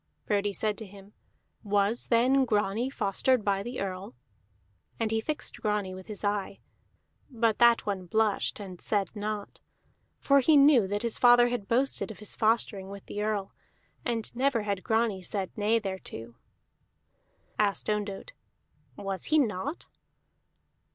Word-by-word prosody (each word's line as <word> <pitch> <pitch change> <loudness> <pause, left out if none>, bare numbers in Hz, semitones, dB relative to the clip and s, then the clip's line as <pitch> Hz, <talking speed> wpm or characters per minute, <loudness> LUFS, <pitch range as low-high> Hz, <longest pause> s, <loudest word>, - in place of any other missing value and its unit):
Frodi 205 -1 +1
said 210 +1 -1
to 220 - -6
him: 200 +1 -15 0.5
"Was 205 +3 +1
then 255 +3 +4
Grani 215 +1 0
fostered 235 0 +1
by 195 -1 +1
the 240 +5 -5
Earl?" 185 -6 -5 0.8
And 225 -1 0
he 225 0 +1
fixed 270 -2 -4
Grani 210 -4 -1
with 185 0 -10
his 210 -2 -8
eye; 205 -1 -2 0.7
but 230 -3 +1
that 235 -1 +5
one 190 -3 -3
blushed 215 +2 0
and 185 -4 -9
said 205 0 -1
naught. 210 0 -5 0.6
For 280 0 +4
he 295 +3 +5
knew 275 -7 +6
that 205 +2 -2
his 235 -2 -1
father 245 0 +6
had 240 -5 -3
boasted 260 +2 0
of 220 - -8
his 210 - -2
fostering 215 -3 +1
with 200 0 -9
the 205 - -5
Earl, 210 -2 -2 0.5
and 235 -1 -3
never 255 -3 +1
had 200 -2 -2
Grani 220 -4 +1
said 190 +1 -3
nay 215 +2 +2
thereto. 190 - -6 1.3
Asked 205 -2 +1
Ondott, 210 - -3 0.6
"Was 195 +2 -4
he 310 - +3
not?" 270 - -1
210 Hz, 145 wpm, -28 LUFS, 200-235 Hz, 1.3 s, knew